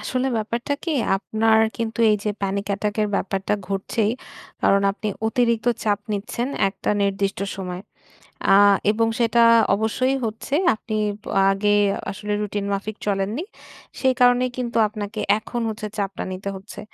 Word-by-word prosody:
আসলে 255 0 -1
ব্যাপারটা 235 +6 -2
কি? 335 - -2 0.3
আপনার 220 +2 +2 0.2
কিন্তু 225 -1 -3
এইযে 210 0 0
প্যানিক 195 +1 -1
অ্যাটাক 205 +1 -1
এর 210 - 0
ব্যাপারটা 195 +1 -1
ঘটছেই। 205 +3 0 0.5
কারণ 200 0 +4
আপনি 215 +1 -4 0.2
অতিরিক্ত 235 0 +1 0.2
চাপ 205 -1 +2
নিচ্ছেন 235 +5 -3 0.2
একটা 195 +1 -3
নির্দিষ্ট 195 0 0 0.2
সময়। 180 -1 -5 0.7
আ - - +8 0.4
এবং 225 +1 +1
সেটা 235 0 +4 0.3
অবশ্যই 255 +5 0
হচ্ছে। 225 +6 -3 0.2
আপনি 215 0 -5 0.3
ব - - -22 0.3
আগে 205 +1 +1 0.4
আসলে 210 +1 -4
রুটিন 205 -1 -3
মাফিক 205 +2 -3
চলেননি। 205 - -1 0.6
সেই 260 -1 +3
কারণেই 245 0 +4
কিন্তু 240 -2 -2
আপনাকে 210 0 -6 0.2
এখন 240 +2 -5
হচ্ছে 215 0 -5
চাপটা 195 -2 -3
নিতে 190 +2 -5
হচ্ছে। 190 +2 -10
210 Hz, 140 wpm, -22 LUFS, 200-230 Hz, 0.7 s, আ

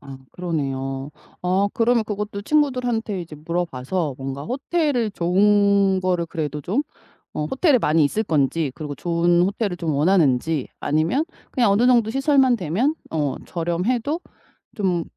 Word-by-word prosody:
아 135 -1 -10
그러네요. 135 -5 -3 0.3
어 190 +3 +2
그러면 230 +2 +2
그것도 210 -1 -4
친구들한테 245 -7 0
이제 160 -3 -9
물어봐서 160 -1 -2
뭔가 135 +1 -5
호텔을 270 - 0
좋은 200 +1 +3
거를 180 -2 0
그래도 150 -2 -4
좀 205 - -1 0.5
어 150 - -2
호텔에 265 - +3
많이 155 -5 +3
있을 215 +10 0
건지 155 -3 +1
그리고 150 -1 -6
좋은 170 +2 +1
호텔을 195 -2 -1
좀 160 -3 -1
원하는지 150 -3 +2
아니면 165 - +1 0.3
그냥 235 -5 +2
어느 220 +5 +3
정도 235 -3 +4
시설만 270 -1 +3
되면 205 - 0 0.2
어 150 -4 -1
저렴해도 220 - -1 0.6
좀 185 -6 0
180 Hz, 310 characters per minute, -22 LUFS, 155-225 Hz, 0.6 s, 정도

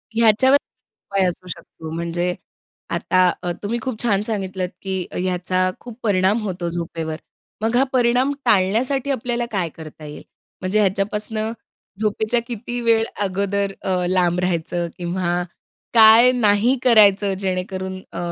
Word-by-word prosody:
ह्याच्यावर, 230 +4 +5 0.6
उपाय 195 -1 +2
असू 180 +1 -4
शकतो 160 -1 -9
म्हणजे 175 +1 -2 0.6
आता 185 0 +3
अ, 175 - -2
तुम्ही 230 +4 -1
खूप 255 -4 -4
छान 205 -4 +2
सांगितलत, 190 -4 -3
की 190 -2 -3 0.2
याचा 185 0 0
खूप 240 -1 -11
परिणाम 200 +1 +2
होतो 180 -4 -3
झोपेवर. 165 -2 -4 0.5
मग 225 +2 +1
हा 265 - +5
परिणाम 250 +2 +2
टाळण्यासाठी 240 +8 +2
आपल्याला 240 -2 -1
काय 180 -5 0
करता 155 -1 -11
येईल, 150 0 -9 0.4
म्हणजे 190 +3 +1
ह्याच्यापासून 210 +3 -1 0.5
झोपेच्या 220 +2 0
किती 240 +1 -5
वेळ 225 -1 +3 0.2
अगोदर 200 +1 -1
अ, 180 -2 0
लांब 180 -1 +2
राहायचं 175 -1 -1
किंवा 175 0 -1 0.5
काय 225 +2 +8
नाही 230 +2 +3
करायचं 205 -4 +5
जेणेकरून 190 0 -3
अ, 170 - -6
195 Hz, 130 wpm, -21 LUFS, 180-225 Hz, 0.6 s, काय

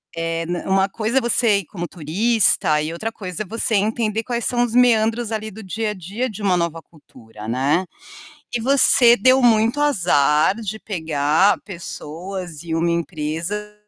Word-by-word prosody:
eh, 165 0 -3
né, 175 0 -3
uma 190 +1 +2
coisa 225 +5 0
é - - -6
você 230 -3 +2
ir 195 - -8
como 175 +1 -6
turista 175 -1 +2
e 155 - -3
outra 220 +7 -4
coisa 190 -2 -6
é - - -14
você 220 +2 0
entender 220 +1 0
quais 240 0 -3
são 245 -1 +1
os 235 - -3
meandros 230 -2 +2
ali, 220 0 -4
do 220 - -11
dia 215 +3 -3
a - - -4
dia 205 +7 -4
de 215 -1 -9
uma 190 -3 +2
nova 170 -1 -2
cultura, 110 -10 -14
né. 140 +10 0 0.7
E 240 - 0
você 250 -2 +5
deu 255 +1 +4
muito 230 +3 +3
azar 175 - +2
de 220 0 -5
pegar 160 -1 +1
pessoas 175 -2 -7
e 165 -1 -3
uma 170 +1 0
empresa 170 +5 -3
195 Hz, 175 wpm, -20 LUFS, 165-225 Hz, 0.7 s, você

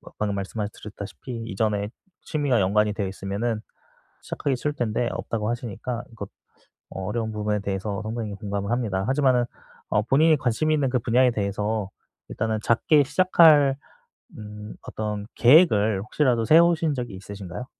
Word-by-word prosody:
뭐 - - -15
방금 105 -1 -1
말씀하 100 +2 -3
드렸다시피 110 +3 -8
이전에 105 -1 -1 0.3
취미와 145 -8 0
연관이 105 +2 +2
되어 100 -2 -3
있으면은 100 +4 -3 0.6
시작하기 140 -2 -2
쉬울 150 +4 -2
텐데 120 -1 -1
없다고 110 -1 -3
하시니까 120 0 -4
이거 115 -3 -7 0.6
어 95 - -6
어려운 110 +2 -2
부분에 105 -1 -1
대해서 100 0 -3
상당히 110 -1 -4
공감을 100 0 -4
합니다. 105 -6 -1
하지만은 130 -3 +3 0.4
어 105 - +2
본인이 155 +7 +4
관심이 135 +5 0
있는 140 -3 +1
그 125 0 +1
분야에 125 +2 +3
대해서 105 -1 -2 0.4
일단은 110 0 -2
작게 145 +7 +3
시작할 155 -4 +5 0.6
음 105 0 -9
어떤 105 -1 -4
계획을 110 - +5
혹시라도 120 0 +1
세우신 165 0 +4
적이 120 -6 -5
있으신가요? 100 +2 -8
110 Hz, 370 characters per minute, -24 LUFS, 105-130 Hz, 0.6 s, 시작할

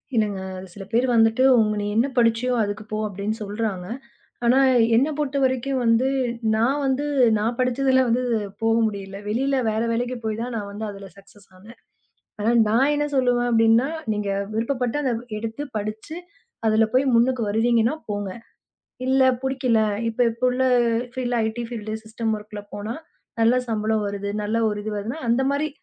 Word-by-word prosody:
இல்லங்க. 205 -3 +1 0.3
சில 200 - -8
பேர் 240 +3 +2
வந்துட்டு, 225 +3 +4 0.2
உங்க 215 -1 +2
நீ - - -3
என்ன 245 +4 +3
படிச்சியோ 235 +2 +2
அதுக்கு 205 +1 -4
போ 215 - -1
அப்டின்னு 205 +2 -4
சொல்றாங்க. 205 -3 -3 0.6
ஆனா 255 +3 +5 0.4
என்ன 265 +6 +4
பொறுத்தவரைக்கும் 270 -2 0
வந்து, 230 +3 +3 0.5
நான் 255 +6 +1
வந்து 270 +2 0 0.3
நான் 230 +3 -1
படிச்சதில 260 +1 +2
வந்து 250 +2 +1 0.4
போக 225 0 +3
முடியல. 195 -2 -6
வெளியில 270 +5 0
வேற 220 +1 -1
வேலைக்குப் 240 0 -2
போய்தான் 230 +3 -3
நான் 200 -1 -5
வந்து 215 +2 -5
அதுல 200 -1 -9
சக்ஸஸ் 200 +1 -19
ஆனேன். 215 +6 -15 0.6
ஆனா, 220 +3 +2 0.2
நான் 265 +6 +3
என்ன 295 0 0
சொல்லுவன் 245 -2 +2
அப்படின்னா, 225 +3 +4 0.3
நீங்க 205 -1 -2 0.2
விருப்பப்பட்ட 245 +3 -1 0.4
எடுத்துப் 225 +6 -6
படிச்சு, 215 +10 -5 0.5
அதுல 220 +1 +4
போய் 265 +2 +3
முன்னுக்கு 250 +1 +2
வருவீங்கன்னா, 230 +4 +2
போங்க! 205 -1 -3 0.8
இல்ல 265 0 +3 0.2
புடிக்கல. 260 -3 +1 0.3
இப்ப 230 +2 -5
எப்போ 230 +3 -5
உள்ள 260 +1 0 0.5
ஃபீல்ட் 245 -2 -2
ஐடி 220 +2 -3
ஃபீல்ட் 220 -3 -6
சிஸ்டம் 220 0 -3
ஒர்க்ல 210 0 -9
போனா 215 +3 -4 0.5
நல்ல 230 +2 +4
சம்பளம் 215 -1 0
வருது. 200 0 -4
நல்ல 215 +2 -1
ஒரு 210 - -3
இது 215 - -4
வருதுனா, 230 +9 -4
அந்த 235 +3 +3
மாரி 295 +2 0
230 Hz, 155 wpm, -23 LUFS, 215-255 Hz, 0.8 s, ஆனா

